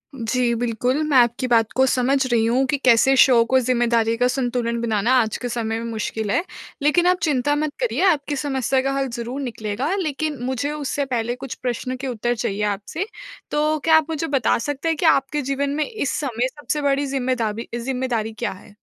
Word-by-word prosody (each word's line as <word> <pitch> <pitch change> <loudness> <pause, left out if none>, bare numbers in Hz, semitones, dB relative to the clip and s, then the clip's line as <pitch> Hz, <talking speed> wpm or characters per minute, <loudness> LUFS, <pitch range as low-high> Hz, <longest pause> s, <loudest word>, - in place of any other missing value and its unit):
जी, 240 0 0
बिल्कुल। 245 +4 0
मैं 285 -4 +3
आपकी 240 +1 +3
बात 225 -3 +3
को 265 - +4
समझ 265 +1 +2
रही 225 -1 +3
हूँ 250 +4 +2
कि 285 - +1
कैसे 265 +1 +4
शो 245 -4 +6
को 260 +2 +3
ज़िम्मेदारी 235 -2 +1
का 245 +1 +3
संतुलन 245 -2 -1
बनाना 225 +1 +1
आज 220 -1 -2
के 245 - -5
समय 225 -1 -2
में 230 0 -5
मुश्किल 220 -1 -3
है। 340 - +1 0.4
लेकिन 345 +5 +3
आप 360 0 +4
चिंता 290 -2 +1
मत 300 0 -1
करिए - - -1
आपकी 290 -1 -2
समस्या 265 -2 0
का 270 - -1
हल 270 -1 0
ज़रूर 245 +4 -4
निकलेगा। 240 - -3
लेकिन 310 -5 -2
मुझे 265 +3 -2
उससे 285 -1 -2
पहले 240 -2 -2
कुछ 260 0 -7
प्रश्न 255 +1 -2
के 270 - -3
उत्तर 240 0 -1
चाहिए 210 -2 -2
आपसे। 210 - -2 0.5
तो 305 +1 +1
क्या 320 +2 +5
आप 315 - +2
मुझे 320 0 -2
बता 275 -5 +2
सकते 290 +6 -3
हैं 325 - +1
कि 335 - -1
आपके 295 -1 +3
जीवन 275 +1 -1
में 305 - +1
इस 430 - -2
समय 255 -4 -1
सबसे 295 +2 -4
बड़ी 280 0 +1
जिम्मेदाबी 245 -5 -2
जिम्मेदारी 240 -3 -2
क्या 235 - -2
है? 205 +2 -14
255 Hz, 200 wpm, -22 LUFS, 235-285 Hz, 0.5 s, शो